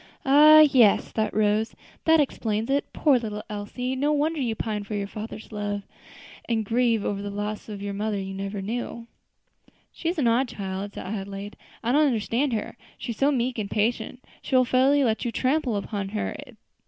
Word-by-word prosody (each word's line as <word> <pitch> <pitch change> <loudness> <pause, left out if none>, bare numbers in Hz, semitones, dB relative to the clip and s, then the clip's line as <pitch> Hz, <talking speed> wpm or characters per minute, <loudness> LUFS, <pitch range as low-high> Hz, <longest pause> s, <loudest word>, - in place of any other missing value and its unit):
"Ah! 305 +3 +8
yes," 255 -9 +5
thought 220 -1 -1
Rose, 215 +1 +1 0.3
"that 320 0 +5
explains 225 -4 -1
it. 280 +1 0
Poor 280 -5 +3
little 210 -2 -5
Elsie! 250 +5 -4
No 285 +3 +1
wonder 300 +1 0
you 230 -3 -1
pine 215 -2 -3
for 210 +1 -5
your 200 -1 -1
father's 215 +2 -8
love, 205 -1 -3 0.7
and 225 -2 0
grieve 230 -1 +1
over 200 -1 -2
the 205 - -4
loss 205 +2 -4
of 210 - -5
the 200 0 -3
mother 210 +1 -2
you 195 0 -4
never 195 +1 -4
knew!" 235 +2 -4 0.9
"She 330 - -3
is 350 - -2
an 275 -6 +2
odd 240 +3 +3
child," 200 -2 -5
said - - -6
Adelaide; 200 0 -5 0.3
"I 235 - +1
don't 300 +3 +4
understand 245 +3 0
her; 225 +2 -3 0.2
she 240 - -5
is 225 - -7
so 280 +1 +4
meek 250 -2 -1
and 200 -2 -3
patient 235 +3 -1 0.2
she 265 - -2
will 255 0 +5
fairly 265 +3 +3
let 225 -3 0
you 240 - -1
trample 260 -1 0
upon 200 -1 -4
her. 210 +1 -3
225 Hz, 190 wpm, -25 LUFS, 205-260 Hz, 0.9 s, Ah